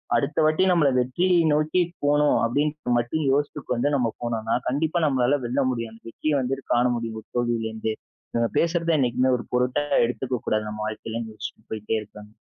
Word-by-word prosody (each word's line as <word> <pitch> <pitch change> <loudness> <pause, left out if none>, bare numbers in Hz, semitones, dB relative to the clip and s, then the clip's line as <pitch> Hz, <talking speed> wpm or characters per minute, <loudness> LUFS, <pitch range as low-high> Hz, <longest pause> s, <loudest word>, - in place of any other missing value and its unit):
அடுத்த 140 +2 0
வாட்டி 155 +4 +3
நம்மள 165 -6 +4
வெற்றியை 175 +9 +2 0.2
நோக்கி 155 +4 +2 0.2
போணும் 145 0 +3
அப்டீன்றது 145 +2 -1
மட்டும் 120 +7 -2
யோசித்து 145 +1 0
கொண்டு 125 - -3
வந்து 130 +5 +1
நம்ம 120 -4 +1
போனோம்னா 115 -2 -1
கண்டிப்பா 160 +5 0
நம்மளால 135 -1 +2
வெல்ல 130 +4 0
முடியும். 115 -2 -4
அந்த 115 - -16
வெற்றிய 155 +5 -1
வந்துட்டு 135 +1 -2
காண 120 +1 +3
முடியும், 115 -1 -4
ஒரு - - -32
தோல்விலேருந்தே. 110 -2 -1 0.4
இவங்க 115 -1 +1
பேசுறத 170 0 +1
என்னைக்குமே 125 0 +2
ஒரு 120 - -8
பொருட்டாவே 125 +4 +1
எடுத்துக்க 125 0 -3
கூடாது, 110 0 0
நம்ம 105 0 -6
வாழ்க்கைல," 110 +1 -5
யோசிச்சிட்டு 110 0 -8
போயிட்டே 110 0 -1
இருப்பேங்க. 105 0 -13
125 Hz, 175 wpm, -24 LUFS, 115-145 Hz, 0.4 s, நம்மள